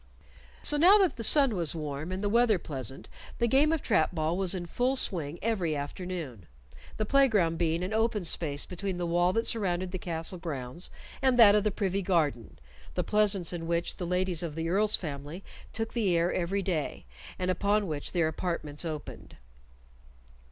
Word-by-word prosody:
So 295 Hz, -, +5 dB
now 365 Hz, +7 st, +7 dB
that 385 Hz, -4 st, +2 dB
the 230 Hz, -, -6 dB
sun 270 Hz, -1 st, +4 dB
was 170 Hz, -4 st, -1 dB
warm 150 Hz, +1 st, -5 dB
and 190 Hz, +2 st, -4 dB
the -, -, +1 dB
weather 230 Hz, 0 st, +3 dB
pleasant 135 Hz, -6 st, -6 dB, 0.3 s
the 235 Hz, -, +1 dB
game 275 Hz, +6 st, +4 dB
of 325 Hz, -3 st, -1 dB
trap -, -, +1 dB
ball 160 Hz, +1 st, 0 dB
was 190 Hz, 0 st, +2 dB
in 175 Hz, -1 st, -4 dB
full 250 Hz, +9 st, 0 dB
swing 165 Hz, -, 0 dB
every 190 Hz, -9 st, 0 dB
afternoon, 145 Hz, -, -6 dB, 0.5 s
the 215 Hz, -, -1 dB
play 275 Hz, +4 st, +4 dB
ground 170 Hz, -8 st, +1 dB
being 165 Hz, 0 st, 0 dB
an 190 Hz, +4 st, -3 dB
open 220 Hz, -3 st, 0 dB
space 145 Hz, -4 st, -2 dB
between 185 Hz, +1 st, -4 dB
the 175 Hz, -, -2 dB
wall 175 Hz, +1 st, +2 dB
that 225 Hz, +2 st, 0 dB
surrounded 185 Hz, -4 st, -1 dB
the 185 Hz, -, -4 dB
castle 170 Hz, +1 st, -3 dB
grounds 145 Hz, -1 st, -6 dB, 0.3 s
and 260 Hz, -2 st, +3 dB
that 215 Hz, -4 st, +8 dB
of 210 Hz, -1 st, +3 dB
the 215 Hz, -, +2 dB
privy 195 Hz, -1 st, -1 dB
garden 150 Hz, -, -1 dB, 0.4 s
the 180 Hz, -, 0 dB
pleasance 200 Hz, -3 st, +2 dB
in 165 Hz, -1 st, -5 dB
which 170 Hz, 0 st, -1 dB
the 175 Hz, -, -4 dB
ladies 180 Hz, -1 st, 0 dB
of 165 Hz, -4 st, -4 dB
the 165 Hz, 0 st, -3 dB
Earl's 210 Hz, +4 st, +3 dB
family 150 Hz, +3 st, -6 dB, 0.3 s
took 225 Hz, 0 st, -4 dB
the 200 Hz, -8 st, +1 dB
air 170 Hz, +1 st, +1 dB
every 195 Hz, +3 st, -1 dB
day, 165 Hz, -, -3 dB, 0.3 s
and 185 Hz, 0 st, 0 dB
upon 205 Hz, +2 st, +1 dB
which 150 Hz, -5 st, -3 dB
their 170 Hz, -3 st, +1 dB
apartments 160 Hz, -2 st, -3 dB
opened. 155 Hz, -3 st, -7 dB
180 Hz, 185 wpm, -29 LUFS, 165-210 Hz, 0.5 s, that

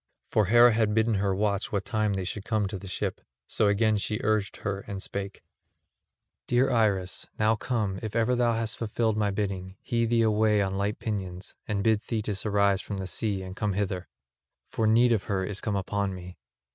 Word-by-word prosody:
For 110 Hz, -, +3 dB
Hera 120 Hz, +4 st, +7 dB
had 110 Hz, -1 st, +1 dB
bidden 110 Hz, 0 st, +3 dB
her 100 Hz, -1 st, +1 dB
watch 105 Hz, +2 st, 0 dB
what 100 Hz, -3 st, -1 dB
time 110 Hz, -1 st, 0 dB
they 95 Hz, -1 st, -2 dB
should 95 Hz, +2 st, -4 dB
come 110 Hz, -2 st, 0 dB
to 100 Hz, -2 st, -5 dB
the 100 Hz, -, -9 dB
ship; 90 Hz, -, -3 dB, 0.2 s
so 105 Hz, -, +1 dB
again 105 Hz, +1 st, +3 dB
she 105 Hz, +1 st, -2 dB
urged 105 Hz, -3 st, 0 dB
her 100 Hz, -1 st, -1 dB
and 100 Hz, -1 st, -4 dB
spake: 100 Hz, +1 st, -5 dB, 1.0 s
"Dear 125 Hz, +2 st, +3 dB
Iris, 100 Hz, -6 st, +1 dB
now 110 Hz, +1 st, +3 dB
come, 105 Hz, -5 st, -2 dB
if 110 Hz, -2 st, -5 dB
ever 115 Hz, +2 st, +2 dB
thou 120 Hz, -1 st, +2 dB
hast 115 Hz, -1 st, -2 dB
fulfilled 110 Hz, 0 st, 0 dB
my 105 Hz, -1 st, +1 dB
bidding, 95 Hz, -2 st, -3 dB
hie 115 Hz, -2 st, +1 dB
thee 115 Hz, 0 st, +2 dB
away 110 Hz, -1 st, +3 dB
on 95 Hz, -1 st, 0 dB
light 100 Hz, +2 st, -1 dB
pinions, 95 Hz, -4 st, -5 dB
and 100 Hz, -2 st, -1 dB
bid 110 Hz, -1 st, +3 dB
Thetis 105 Hz, -2 st, -2 dB
arise 100 Hz, -1 st, +3 dB
from 100 Hz, -, -5 dB
the 95 Hz, -, -4 dB
sea 95 Hz, +2 st, -2 dB
and 95 Hz, 0 st, -8 dB
come 105 Hz, -1 st, -1 dB
hither. 95 Hz, -2 st, -2 dB, 0.6 s
For 110 Hz, -, +1 dB
need 120 Hz, +2 st, +5 dB
of 110 Hz, -, 0 dB
her 95 Hz, -2 st, -1 dB
is 105 Hz, +1 st, -4 dB
come 105 Hz, -3 st, -1 dB
upon 100 Hz, 0 st, -1 dB
me. 90 Hz, -2 st, -10 dB
105 Hz, 200 wpm, -27 LUFS, 95-110 Hz, 1.0 s, Hera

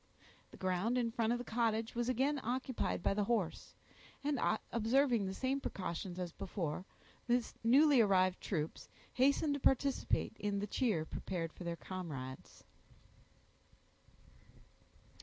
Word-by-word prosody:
The -, -, -14 dB
ground 185 Hz, +6 st, 0 dB
in 235 Hz, -2 st, +1 dB
front 230 Hz, -1 st, +1 dB
of 240 Hz, -, +2 dB
the 245 Hz, -, -6 dB
cottage 225 Hz, -1 st, 0 dB
was 240 Hz, +1 st, -1 dB
again 270 Hz, +3 st, +1 dB
occupied 250 Hz, -5 st, -2 dB
by -, -, +2 dB
the 205 Hz, 0 st, 0 dB
horse; 205 Hz, -7 st, -1 dB, 0.5 s
and 285 Hz, -2 st, 0 dB, 0.3 s
observing 235 Hz, -1 st, +2 dB
the 190 Hz, -, -3 dB
same 265 Hz, +4 st, -1 dB
precautions 180 Hz, -3 st, -4 dB
as 180 Hz, -2 st, -3 dB
before, 175 Hz, -2 st, -4 dB, 0.4 s
the 240 Hz, -1 st, +2 dB, 0.2 s
newly 275 Hz, +3 st, +6 dB
arrived 185 Hz, -3 st, +3 dB
troops 160 Hz, -5 st, -3 dB, 0.2 s
hastened 280 Hz, +3 st, +3 dB
to 285 Hz, -, -2 dB
participate 270 Hz, -3 st, +1 dB
in 205 Hz, -1 st, -1 dB
the 200 Hz, -, -1 dB
cheer 210 Hz, -7 st, 0 dB
prepared 165 Hz, 0 st, -4 dB
for -, -, -9 dB
their 170 Hz, 0 st, -2 dB
comrades. 150 Hz, -7 st, -7 dB
225 Hz, 135 wpm, -35 LUFS, 185-255 Hz, 0.5 s, newly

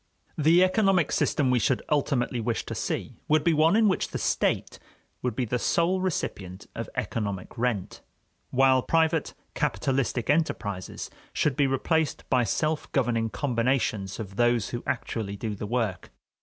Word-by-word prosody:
The 165 Hz, +4 st, +5 dB
economic 185 Hz, -4 st, +3 dB
system 135 Hz, -4 st, +1 dB
we 125 Hz, -, +3 dB
should 100 Hz, -, +1 dB
ultimately 135 Hz, -4 st, +1 dB
wish 115 Hz, 0 st, -2 dB
to -, -, -5 dB
see -, -, -4 dB
would 155 Hz, -1 st, +3 dB
be 170 Hz, -, +3 dB
one 160 Hz, +4 st, +4 dB
in 220 Hz, -1 st, +5 dB
which 190 Hz, -, +1 dB
the -, -, -4 dB
state -, -, 0 dB, 0.4 s
would 125 Hz, -, -2 dB
be 130 Hz, -, 0 dB
the 125 Hz, +2 st, -1 dB
sole 180 Hz, +7 st, +1 dB
recipient 95 Hz, -, -3 dB
of -, -, -5 dB
economic 100 Hz, -5 st, -3 dB
rent, 115 Hz, -6 st, -2 dB, 0.5 s
while 130 Hz, 0 st, +4 dB
private 160 Hz, +2 st, +1 dB, 0.2 s
capitalistic 130 Hz, -3 st, -1 dB
enterprises 110 Hz, -, -1 dB, 0.2 s
should 145 Hz, -3 st, +1 dB
be 140 Hz, 0 st, +3 dB
replaced 155 Hz, +3 st, 0 dB
by 125 Hz, -1 st, +4 dB
self 155 Hz, +8 st, -1 dB
governing 115 Hz, -4 st, +1 dB
combinations 115 Hz, -7 st, -1 dB
of 100 Hz, -3 st, -7 dB
those 120 Hz, -3 st, +2 dB
who 120 Hz, -, -4 dB
actually 110 Hz, -4 st, -3 dB
do 110 Hz, +1 st, -3 dB
the 105 Hz, +1 st, -5 dB
work. 115 Hz, -5 st, -2 dB
125 Hz, 155 wpm, -27 LUFS, 115-155 Hz, 0.5 s, The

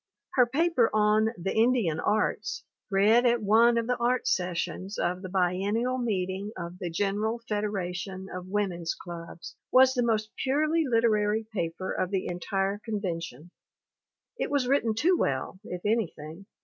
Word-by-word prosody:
Her 250 Hz, -2 st, +5 dB
paper 295 Hz, -2 st, +2 dB
on 215 Hz, +1 st, +3 dB
The 180 Hz, +2 st, -2 dB
Indian 220 Hz, -9 st, +2 dB
Arts 210 Hz, +1 st, -1 dB, 0.3 s
read 210 Hz, +4 st, +4 dB
at 235 Hz, -2 st, +2 dB
one 230 Hz, +3 st, +5 dB
of 230 Hz, -, +1 dB
the 250 Hz, +1 st, 0 dB
art 245 Hz, +1 st, 0 dB
sessions 180 Hz, +2 st, -2 dB
of 180 Hz, +1 st, -1 dB
the 185 Hz, -, -6 dB
biennial 200 Hz, +7 st, 0 dB
meeting 195 Hz, -3 st, -2 dB
of 175 Hz, 0 st, -7 dB
the 175 Hz, -, -3 dB
General 205 Hz, +6 st, -1 dB
Federation 190 Hz, -2 st, -3 dB
of 180 Hz, 0 st, -6 dB
Women's 185 Hz, -4 st, -2 dB
Clubs 170 Hz, -1 st, -9 dB
was 260 Hz, 0 st, +6 dB
the 250 Hz, -, 0 dB
most 220 Hz, -2 st, 0 dB
purely 305 Hz, +4 st, +1 dB
literary 220 Hz, -2 st, +2 dB
paper 170 Hz, -1 st, -3 dB
of 185 Hz, -, -1 dB
the 190 Hz, -1 st, -1 dB
entire 195 Hz, +3 st, -2 dB
con 220 Hz, -3 st, -3 dB
vention. 165 Hz, -, -5 dB, 0.9 s
It -, -, -1 dB
was 280 Hz, -3 st, +1 dB
written 240 Hz, -5 st, +2 dB
too 345 Hz, +11 st, +3 dB
well, 140 Hz, +6 st, -1 dB
if 180 Hz, -2 st, -7 dB
anything. 195 Hz, -5 st, -2 dB
205 Hz, 150 wpm, -28 LUFS, 180-235 Hz, 0.9 s, was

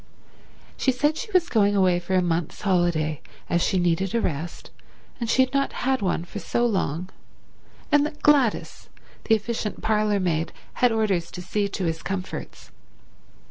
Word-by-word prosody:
She 265 Hz, -, +2 dB
said 295 Hz, +5 st, +1 dB
she 425 Hz, -, -6 dB
was 365 Hz, -3 st, +3 dB
going 205 Hz, -7 st, +3 dB, 0.2 s
for 180 Hz, +2 st, -2 dB
a 185 Hz, -, +3 dB
month's 170 Hz, -1 st, -2 dB
holiday 175 Hz, -6 st, +1 dB, 0.3 s
as 170 Hz, -, +2 dB
she 190 Hz, -, +1 dB
needed 175 Hz, +3 st, +1 dB
a -, -, +3 dB
rest 165 Hz, -1 st, -4 dB, 0.5 s
and 235 Hz, -2 st, -3 dB
she 260 Hz, -, +5 dB
had 260 Hz, -, -4 dB
not 275 Hz, 0 st, +1 dB
had 265 Hz, -3 st, +2 dB
one 180 Hz, -3 st, -1 dB
for 205 Hz, -, -7 dB
so 240 Hz, +3 st, 0 dB
long, 185 Hz, -5 st, -1 dB, 0.8 s
and 290 Hz, -1 st, +5 dB
that 300 Hz, -1 st, -12 dB
Gladys, 275 Hz, -7 st, +2 dB, 0.4 s
the 225 Hz, -, +5 dB
efficient 220 Hz, 0 st, -4 dB
parlourmaid, 200 Hz, -7 st, +1 dB, 0.3 s
had 245 Hz, -1 st, +5 dB
orders 200 Hz, -6 st, 0 dB
to 180 Hz, -, -8 dB
see 205 Hz, +2 st, 0 dB
to 195 Hz, -2 st, -3 dB
his 165 Hz, 0 st, -2 dB
comforts. 190 Hz, -1 st, -6 dB
200 Hz, 160 wpm, -24 LUFS, 175-240 Hz, 0.8 s, she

